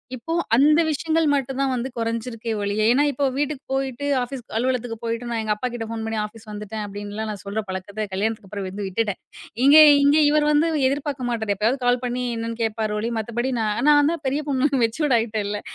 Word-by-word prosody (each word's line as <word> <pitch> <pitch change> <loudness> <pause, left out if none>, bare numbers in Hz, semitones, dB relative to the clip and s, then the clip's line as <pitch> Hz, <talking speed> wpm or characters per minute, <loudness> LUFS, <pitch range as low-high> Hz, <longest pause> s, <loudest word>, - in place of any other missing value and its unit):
இப்போ 255 +7 -5 0.2
அந்த 300 +5 +5
விஷயங்கள் 320 +2 +1
மட்டுந்தான் 270 0 0
வந்து 250 +2 -2
குறைஞ்சிருக்கே 230 0 -3
ஒழிய 205 +1 0
ஏன்னா, 270 +4 +4
இப்போ 280 +1 -1
வீட்டுக்கு 290 -1 -2
போயிட்டு, 270 0 -2 0.2
ஆஃபிஸ் 250 +1 -5 0.2
அலுவலகத்துக்கு 245 -1 -1
போயிட்டு 230 +1 -3
நான் 230 -1 -1
எங்க 215 -1 +1
அப்பாகிட்ட 240 0 -4
ஃபோன் 225 -1 -4
பண்ணி 225 0 -3
"ஆஃபிஸ் 220 +1 -13
வந்துட்டேன்" 210 +1 -6
அப்டின்லாம் 205 +2 -6
நான் 205 - -7
சொல்ற 205 +2 -2
பழக்கத்த 200 +3 -4
கல்யாணத்துக்கு 210 +1 -2
அப்பறம் 200 -1 -5
வந்து 200 +1 -5
விட்டுட்டேன். 205 +1 -2 0.5
எங்க 285 +2 +8 0.3
இங்க 285 +2 +5
இவர் 300 0 +3
வந்து 305 +3 +3 0.2
எதிர்பார்க்க 275 -3 -3
மாட்டாரு. 220 -4 -1
எப்பயாவது 245 +5 0
கால் 245 0 +2
பண்ணி 250 0 -2
என்னன்னு 230 0 -4
கேட்பாரு 220 -1 -1
ஒழிய, 230 +2 -2
மத்தபடி 240 +4 -2
நான், 215 +1 -1
நான் 290 +1 +5
தான் 330 -3 -7
பெரிய 280 +3 0
பொண்ணு 275 +1 +2
மெச்சூர்டு 240 +3 +2
ஆயிட்டேன்ல. 210 -2 -3
235 Hz, 185 wpm, -23 LUFS, 215-270 Hz, 0.5 s, எங்க